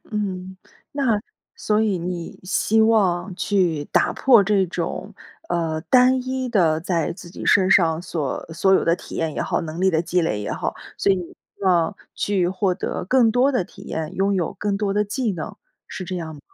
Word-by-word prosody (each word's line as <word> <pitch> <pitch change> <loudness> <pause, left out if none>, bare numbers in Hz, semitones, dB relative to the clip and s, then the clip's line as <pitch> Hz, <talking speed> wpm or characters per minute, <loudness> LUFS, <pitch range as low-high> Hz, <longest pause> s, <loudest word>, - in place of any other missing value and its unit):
嗯。 190 -3 -4 0.4
那 255 -7 +1 0.4
所 210 0 +1
以 205 -5 +1
你 175 0 -5
希 215 +3 +2
望 200 -4 +2
去 175 -6 0
打 - - +2
破 240 -6 +5
这 200 -1 +3
种， 170 -1 -4 0.3
呃， 160 -2 -1
单 255 +4 +4
一 260 -1 -2
的 165 -8 +2
在 170 -1 -1
自 175 -1 -11
己 - - -8
身 190 -2 +4
上 165 -3 +4
所 150 -7 -3
所 180 +4 +2
有 - - +4
的 165 - +3
体 - - -10
验 160 -2 -1
也 - - -1
好、 - - -1
能 160 +1 -6
力 190 0 +4
的 160 -2 +2
积 180 +1 +1
累 105 -11 -1
也 105 - -4
好。 - - -3 0.2
所 - - +2
以 - - +1
你 180 - -3
希 - - -22
望 180 0 +2 0.2
去 190 -4 0
获 190 -1 0
得 180 - -4
更 250 -2 +4
多 250 +4 +3
的 250 -9 0
体 - - -15
验、 160 -1 -4
拥 195 +2 +1
有 175 -4 -1
更 200 +1 -2
多 200 -1 -1
的 210 +1 +1
技 220 +1 -1
能， 165 -4 -6 0.3
是 185 - -6
这 185 +1 -4
样 160 -2 -5
吗？ 145 - -12
185 Hz, 220 characters per minute, -22 LUFS, 170-210 Hz, 0.4 s, 破